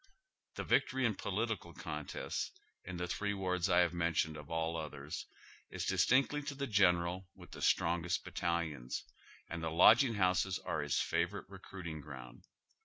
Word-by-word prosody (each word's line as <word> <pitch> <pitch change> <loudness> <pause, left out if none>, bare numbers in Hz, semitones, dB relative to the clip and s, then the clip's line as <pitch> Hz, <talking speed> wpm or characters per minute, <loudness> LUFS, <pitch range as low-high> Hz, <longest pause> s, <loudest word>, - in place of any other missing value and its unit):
The - - -3
vic - - +3
tory 130 0 0
in 115 - +3
political 100 -3 -2
contests, 75 -5 -4 0.3
in 95 -1 -6
the 90 0 -2
three 100 +3 -1
wards 90 -1 0
I 90 0 +6
have 85 -1 +2
men 85 -1 0
tioned 80 0 +1
of 75 -1 -9
all 80 0 -1
others, 75 -2 -5 0.4
is - - -4
distinctly 140 +3 +3
to 145 -1 -5
the 140 0 -2
general 90 -4 +2
with - - -14
the - - -9
strongest 85 +1 +2
battalions, 80 -7 -2 0.4
and 85 0 -5
the 80 - -1
lodging 110 - +6
houses 95 0 +2
are 85 -5 -2
his 75 -1 0
favor - - 0
ite - - -26
reci'uiting 85 -5 -7
ground. 65 -5 -10
85 Hz, 170 wpm, -35 LUFS, 80-100 Hz, 0.4 s, I